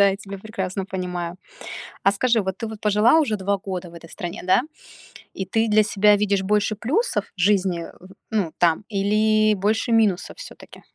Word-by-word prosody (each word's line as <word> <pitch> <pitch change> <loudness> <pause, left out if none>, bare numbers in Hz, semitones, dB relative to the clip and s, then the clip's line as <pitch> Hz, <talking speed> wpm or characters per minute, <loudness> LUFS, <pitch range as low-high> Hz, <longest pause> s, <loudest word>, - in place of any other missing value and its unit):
Да, 200 - +6
я 195 - -1
тебя 195 -1 -9
прекрасно 195 -2 -4
понимаю. 180 -2 -4 0.7
А 195 - +5
скажи, 230 +2 +2
вот 190 -1 -3
ты 225 - -4
вот 220 -1 -9
пожила 210 +8 +4
уже 250 -9 +1
2 190 -2 -3
в - - -16
этой 165 0 -12
стране, 175 -1 -6
да, 185 +5 +4 0.7
и 190 - -4
ты 225 +4 0
для 215 0 +4
себя 210 0 +4
видишь 200 -1 +1
больше 210 +2 +1
плюсов 315 - 0
в - - -18
жизни, 185 -3 +2
э, - - -10 0.4
ну, 200 -8 -1
там 170 +3 +2
или 215 +1 +2
больше 215 +4 0
минусов 215 - +1
всё-таки? - - -12
200 Hz, 180 wpm, -22 LUFS, 190-215 Hz, 0.7 s, Да